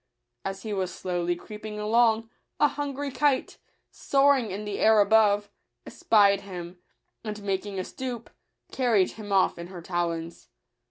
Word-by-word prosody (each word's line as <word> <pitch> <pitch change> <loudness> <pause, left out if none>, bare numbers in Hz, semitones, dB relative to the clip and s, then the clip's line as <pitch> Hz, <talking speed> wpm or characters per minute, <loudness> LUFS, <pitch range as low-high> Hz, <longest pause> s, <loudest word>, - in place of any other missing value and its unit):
As 195 0 -5
he 215 -2 -4
was 190 -2 -2
slowly 175 -1 -2
creeping 210 +4 -8
along, 225 +1 +2 0.3
a 295 - +6
hungry 285 -1 -4
kite, 280 -1 0 0.3
soaring 275 -4 +2
in 200 +3 -5
the 205 -1 -4
air 220 0 +5
above, 205 0 +4 0.3
espied 200 - +3
him, 180 -2 -8 0.4
and 210 -2 -6
making 195 0 -3
a 185 - -1
stoop, 245 +1 -6 0.4
carried 230 -8 +2
him 210 -2 -9
off 190 -3 +2
in 170 - -6
her 180 -1 -9
talons. 170 -1 -3
205 Hz, 145 wpm, -26 LUFS, 185-230 Hz, 0.4 s, a